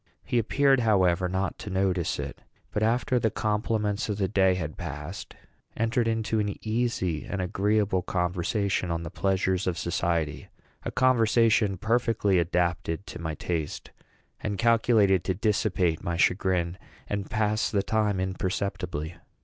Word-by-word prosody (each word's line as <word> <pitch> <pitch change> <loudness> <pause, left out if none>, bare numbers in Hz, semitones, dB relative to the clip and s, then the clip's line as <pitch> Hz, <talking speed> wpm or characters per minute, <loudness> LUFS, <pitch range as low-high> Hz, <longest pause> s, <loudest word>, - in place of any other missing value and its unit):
He 125 -2 +1
appeared, 135 +4 +3
however, 95 -5 +3
not 95 +1 -2
to 110 -3 -6
notice 95 -3 0
it, - - -6 0.3
but, 105 - -2
after 120 +3 +2
the 110 - +2
compliments 105 0 -1
of 105 - -1
the 100 -2 +1
day 95 -2 +3
had 80 -4 -4
passed, 80 +2 -7 0.4
entered 115 +1 +1
into 110 -1 0
an 105 -1 -1
easy 110 -8 0
and 100 - -4
agreeable 100 +1 +1
conversation 90 +2 -1
on 85 0 -2
the 80 - -6
pleasures 95 -1 0
of 90 -2 0
society 85 -3 -1 0.3
a - - -4
conversation 115 -5 +3
perfectly 110 -2 +2
adapted 85 +1 -1
to - - -8
my 80 -2 -3
taste, 80 -3 -4 0.5
and 105 -2 -3
calculated 110 -5 +3
to 95 - 0
dissipate 95 -5 0
my 85 -1 -2
chagrin 90 -1 +1 0.3
and 100 -1 -3
pass 110 -1 +1
the 100 -3 0
time 105 -3 +1
imperceptibly. 95 -3 -3
95 Hz, 140 wpm, -27 LUFS, 90-110 Hz, 0.5 s, appeared